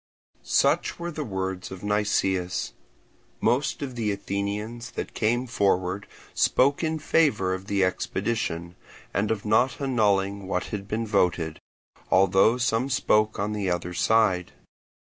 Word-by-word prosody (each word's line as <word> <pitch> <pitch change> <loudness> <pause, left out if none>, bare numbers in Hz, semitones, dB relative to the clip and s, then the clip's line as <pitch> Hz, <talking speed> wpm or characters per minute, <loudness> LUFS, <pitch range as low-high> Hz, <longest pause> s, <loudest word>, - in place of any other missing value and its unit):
Such - - +2
were 175 0 -4
the 155 -1 -4
words 95 -5 -4
of 95 0 -9
Nicias. 95 -3 0 0.7
Most 140 +3 +1
of 130 -2 -5
the 115 -3 -1
Athenians 105 +4 -4
that - - -5
came 120 +3 +1
forward 95 -4 0 0.3
spoke 140 +5 +3
in 160 0 0
favour 115 - +2
of 95 +1 -6
the 100 -1 +1
expedition, 95 -2 -2 0.4
and 100 +2 0
of 110 -2 -2
not 110 +5 +2
annulling 100 -7 +1
what 90 -2 -1
had 100 -1 -4
been 110 +2 -2
voted, 90 -6 0 0.5
although 95 +5 +4
some 125 +1 0
spoke 110 -5 +2
on 105 +2 -1
the 100 -3 -1
other 90 0 -2
side. 95 -1 +2
105 Hz, 135 wpm, -26 LUFS, 95-115 Hz, 0.7 s, although